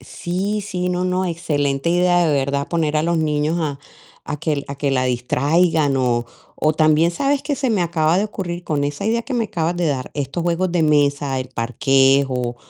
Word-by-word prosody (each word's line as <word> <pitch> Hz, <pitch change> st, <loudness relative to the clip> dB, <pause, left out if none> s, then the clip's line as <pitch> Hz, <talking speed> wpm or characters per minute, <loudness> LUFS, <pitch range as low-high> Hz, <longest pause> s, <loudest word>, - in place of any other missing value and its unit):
Sí, 185 Hz, +10 st, -3 dB
sí, 180 Hz, -3 st, -3 dB
no, 180 Hz, 0 st, -1 dB
no, 185 Hz, +1 st, 0 dB
excelente 150 Hz, -5 st, -1 dB
idea, 175 Hz, 0 st, +3 dB
de 155 Hz, -, +2 dB
verdad, 140 Hz, +1 st, -1 dB
poner 155 Hz, -3 st, 0 dB
a 150 Hz, -, +2 dB
los 170 Hz, +1 st, 0 dB
niños 150 Hz, +1 st, 0 dB
a 145 Hz, -3 st, -2 dB, 0.5 s
a 150 Hz, -, -4 dB
que 145 Hz, -2 st, -2 dB
a 140 Hz, -, -4 dB
que 140 Hz, 0 st, -1 dB
la 130 Hz, -1 st, +1 dB
distraigan, 145 Hz, +5 st, +1 dB
o 120 Hz, -2 st, +1 dB, 0.3 s
o 155 Hz, -, +2 dB
también, 155 Hz, +1 st, +3 dB
¿sabes 275 Hz, +10 st, 0 dB
qué 290 Hz, -, -1 dB
se 270 Hz, -1 st, -1 dB
me 205 Hz, -5 st, +1 dB
acaba 165 Hz, -1 st, +1 dB
de 200 Hz, -, +2 dB
ocurrir 180 Hz, -4 st, -5 dB
con 145 Hz, -3 st, -1 dB
esa 145 Hz, 0 st, -4 dB
idea 230 Hz, +2 st, +1 dB
que 260 Hz, +2 st, -5 dB
me 235 Hz, -2 st, +1 dB
acabas 175 Hz, -4 st, -2 dB
de 175 Hz, -1 st, 0 dB
dar? 135 Hz, -4 st, -2 dB
Estos 145 Hz, +4 st, -3 dB
juegos 175 Hz, +1 st, 0 dB
de 175 Hz, -2 st, +2 dB
mesa, 145 Hz, -3 st, +2 dB
el 130 Hz, 0 st, -5 dB
parques 135 Hz, +3 st, +2 dB
o 125 Hz, -2 st, -3 dB
155 Hz, 210 wpm, -20 LUFS, 140-175 Hz, 0.5 s, idea